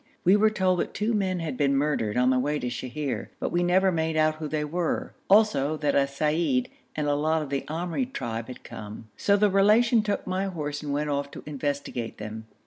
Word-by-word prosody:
We 185 Hz, +3 st, +6 dB
were 215 Hz, +1 st, +5 dB
told 185 Hz, -4 st, +1 dB
that -, -, -3 dB
two 215 Hz, +3 st, 0 dB
men 190 Hz, -4 st, 0 dB
had 155 Hz, -5 st, -3 dB
been 140 Hz, -1 st, +2 dB
murdered 135 Hz, -7 st, 0 dB
on 125 Hz, +1 st, +4 dB
the 130 Hz, -, +3 dB
way 145 Hz, +3 st, 0 dB
to 125 Hz, -4 st, -3 dB
Sheher, 130 Hz, +3 st, -4 dB
but -, -, -2 dB
we 175 Hz, -, +1 dB
never 185 Hz, +2 st, +3 dB
made 160 Hz, -2 st, -1 dB
out 155 Hz, 0 st, +3 dB
who 155 Hz, -1 st, -4 dB
they 150 Hz, 0 st, -1 dB
were; 170 Hz, +2 st, -2 dB, 0.2 s
also 155 Hz, -8 st, +4 dB
that 150 Hz, -1 st, 0 dB
a 140 Hz, -1 st, +3 dB
seyyid 145 Hz, -2 st, 0 dB, 0.3 s
and 150 Hz, -, -1 dB
a 145 Hz, -, +2 dB
lot 155 Hz, +2 st, +1 dB
of 140 Hz, -, -8 dB
the 140 Hz, -1 st, 0 dB
Amri 175 Hz, -, -2 dB
tribe 115 Hz, -, -4 dB
had 125 Hz, -1 st, -10 dB
come, 110 Hz, +1 st, -9 dB
so 200 Hz, 0 st, +3 dB
the 205 Hz, 0 st, +3 dB
Relation 215 Hz, +4 st, +5 dB
took 205 Hz, -1 st, -2 dB
my 185 Hz, +1 st, -1 dB
horse 150 Hz, -6 st, -4 dB
and 150 Hz, -2 st, -4 dB
went 145 Hz, +1 st, -1 dB
off 140 Hz, 0 st, -1 dB
to -, -, -10 dB
investigate 140 Hz, -5 st, -3 dB
them. 110 Hz, +1 st, -7 dB
150 Hz, 225 wpm, -26 LUFS, 140-185 Hz, 0.3 s, We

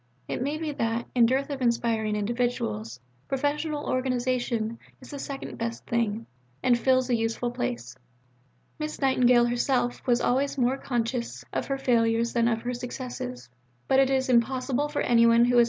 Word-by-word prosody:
It -, -, -3 dB
may 285 Hz, +4 st, -1 dB
be 310 Hz, -1 st, -3 dB
that, 230 Hz, -3 st, -1 dB
in 235 Hz, -2 st, +5 dB
dearth 270 Hz, +4 st, 0 dB
of 275 Hz, -2 st, -4 dB
inspiring 230 Hz, -3 st, +1 dB
individuals, 205 Hz, -, -2 dB, 0.3 s
professional 290 Hz, +2 st, -1 dB
organization 245 Hz, -3 st, -1 dB, 0.2 s
is 255 Hz, -, -13 dB
the 285 Hz, -, -6 dB
second 275 Hz, 0 st, -6 dB
best 230 Hz, 0 st, -4 dB
thing, 230 Hz, -1 st, -1 dB, 0.4 s
and 245 Hz, -, +5 dB
fills 255 Hz, +1 st, +2 dB
a -, -, +4 dB
useful 225 Hz, +1 st, -1 dB
place. 120 Hz, -, -4 dB, 0.8 s
Miss 305 Hz, 0 st, -4 dB
Nightingale 250 Hz, -3 st, +4 dB
herself 245 Hz, 0 st, 0 dB
was 240 Hz, -1 st, +4 dB
always 275 Hz, +4 st, +1 dB
more 255 Hz, +1 st, +2 dB
conscious 240 Hz, -1 st, -2 dB
of -, -, -2 dB
her 275 Hz, -, -1 dB
failures 235 Hz, -3 st, +2 dB
than 235 Hz, -1 st, +3 dB
of 225 Hz, -1 st, 0 dB
her 245 Hz, +1 st, -2 dB
successes. 240 Hz, -, -6 dB
245 Hz, 135 wpm, -27 LUFS, 230-260 Hz, 0.8 s, in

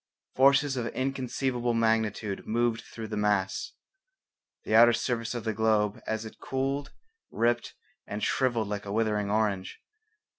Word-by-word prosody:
Forces 135 Hz, +1 st, +4 dB
of 120 Hz, -1 st, -1 dB
inconceivable 125 Hz, -2 st, -1 dB
magnitude 110 Hz, -3 st, 0 dB
moved 115 Hz, 0 st, +1 dB
through 115 Hz, -1 st, -8 dB
the 110 Hz, -, -3 dB
mass. 105 Hz, -, 0 dB, 0.9 s
The -, -, -3 dB
outer 120 Hz, +2 st, +8 dB
surface 115 Hz, 0 st, -2 dB
of 120 Hz, -, -4 dB
the 110 Hz, -1 st, -1 dB
globe 105 Hz, -1 st, +1 dB
as 110 Hz, 0 st, -2 dB
it 110 Hz, -, -10 dB
cooled 135 Hz, +1 st, -2 dB, 0.4 s
ripped 120 Hz, +1 st, 0 dB, 0.3 s
and 105 Hz, +1 st, -5 dB
shrivelled 120 Hz, -5 st, +1 dB
like 105 Hz, 0 st, -4 dB
a -, -, -4 dB
withering 105 Hz, -1 st, 0 dB
orange. 100 Hz, -3 st, -1 dB
115 Hz, 140 wpm, -28 LUFS, 105-125 Hz, 0.9 s, outer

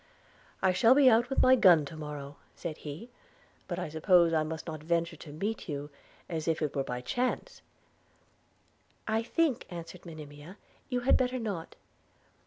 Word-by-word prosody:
'I 185 Hz, -1 st, +4 dB
shall 230 Hz, +7 st, +5 dB
be 270 Hz, -3 st, +7 dB
out 235 Hz, +2 st, +3 dB
with 270 Hz, -, +2 dB
my 260 Hz, -, +7 dB
gun 175 Hz, -, +6 dB
to 150 Hz, -, -9 dB
morrow,' 145 Hz, -2 st, -7 dB, 0.2 s
said 160 Hz, -2 st, -5 dB
he; 160 Hz, +12 st, -8 dB, 0.6 s
'but 175 Hz, -, -3 dB
I 180 Hz, -, -3 dB
suppose 165 Hz, +2 st, +4 dB
I 160 Hz, -, +3 dB
must 160 Hz, +1 st, -4 dB
not 155 Hz, -3 st, -6 dB
venture 170 Hz, +1 st, 0 dB
to 150 Hz, -, -11 dB
meet 200 Hz, +6 st, -4 dB
you 145 Hz, 0 st, -5 dB, 0.4 s
as 160 Hz, -2 st, -4 dB
if 165 Hz, -1 st, +1 dB
it 150 Hz, -1 st, -2 dB
were 135 Hz, -, +1 dB
by 125 Hz, -1 st, -4 dB
chance?' 250 Hz, -, -2 dB, 1.5 s
'I 220 Hz, 0 st, +1 dB
think,' 280 Hz, +2 st, 0 dB
answered 170 Hz, 0 st, -8 dB
Monimia, 155 Hz, +2 st, -10 dB, 0.3 s
'you 250 Hz, -1 st, -1 dB
had 255 Hz, -, +4 dB
better 255 Hz, 0 st, 0 dB
not. 200 Hz, -9 st, -5 dB
170 Hz, 170 wpm, -30 LUFS, 155-225 Hz, 1.5 s, be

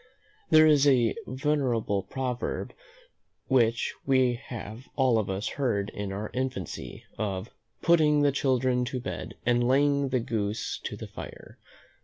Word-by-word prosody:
There 155 Hz, 0 st, +7 dB
is 145 Hz, -2 st, +5 dB
a 125 Hz, -4 st, +4 dB
venerable 130 Hz, -7 st, 0 dB
proverb 130 Hz, +2 st, -3 dB, 0.7 s
which 115 Hz, -3 st, +2 dB
we 130 Hz, -2 st, +3 dB
have 115 Hz, +1 st, -8 dB
all 130 Hz, -4 st, +3 dB
of 105 Hz, -, -2 dB
us 95 Hz, +2 st, -2 dB
heard 110 Hz, -7 st, -1 dB
in 100 Hz, -1 st, -5 dB
our 105 Hz, +2 st, -5 dB
infancy, 125 Hz, -7 st, -4 dB, 0.2 s
of 100 Hz, 0 st, -3 dB, 0.3 s
"putting 150 Hz, -3 st, +4 dB
the 145 Hz, -, +4 dB
children 130 Hz, -2 st, +1 dB
to 125 Hz, +1 st, -3 dB
bed, 125 Hz, -, -6 dB
and 120 Hz, 0 st, +3 dB
laying 140 Hz, +2 st, +3 dB
the 130 Hz, -1 st, +1 dB
goose 110 Hz, -2 st, -2 dB
to -, -, -4 dB
the -, -, -7 dB
fire." -, -, -10 dB
125 Hz, 140 wpm, -28 LUFS, 110-135 Hz, 0.7 s, There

